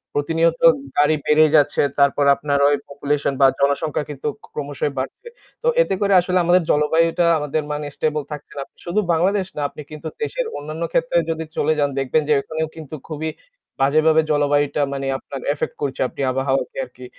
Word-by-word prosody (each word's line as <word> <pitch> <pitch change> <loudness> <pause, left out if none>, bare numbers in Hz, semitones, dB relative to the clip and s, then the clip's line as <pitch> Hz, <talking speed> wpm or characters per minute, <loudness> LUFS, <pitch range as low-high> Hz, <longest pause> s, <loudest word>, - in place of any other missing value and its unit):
প্রতিনিয়ত 165 +3 +1 0.4
গাড়ি 150 +2 +4
বেড়ে 155 +1 +5
যাচ্ছে। 145 -1 +3 0.2
তারপর 140 0 +3
আপনার 140 0 -1
ওই 145 - +3
পপুলেশন 145 0 -1
বা 135 - +8
জনসংখ্যা 140 +2 0
কিন্তু 145 0 -5 0.2
ক - - -12
ক্রমশই 145 0 -3
বাড়ছে। 390 - -6 0.4
তো - - 0
এতে - - 0
করে 200 -1 +2
আসলে 180 +1 0
আমাদের 175 +1 +4
জলবায়ুটা 165 +3 +2
আমাদের 150 +1 -2
মানে 150 0 -3
স্টেবল 150 -1 -1
থাকছে 150 -1 -8
না। - - -2 0.2
শুধু 175 +5 0
বাংলাদেশ 190 +3 +1
না, 150 - -3
আপনি - - -10
কিন্তু 155 +1 -7 0.2
দেশের - - -2
অন্যান্য 155 +3 -5
ক্ষেত্রে 165 +1 +1
যদি 160 0 -3
চলে 155 +2 +2
যান 145 -1 +2
দেখবেন 135 +4 +1
যে - - +5
ওখানেও 160 +2 -3
কিন্তু 155 -1 -8
খুবই 155 +1 -3 0.5
বাজেভাবে 155 +3 +4
জলবায়ুটা 145 0 +1
মানে 135 0 -4
আপনার 135 -1 -8
এফেক্ট 150 - -4
করছে, 135 -2 -2
আপনি - - -8
আবহাওয়াকে 135 - -1
আরকি। - - -13
150 Hz, 175 wpm, -21 LUFS, 145-160 Hz, 0.5 s, বা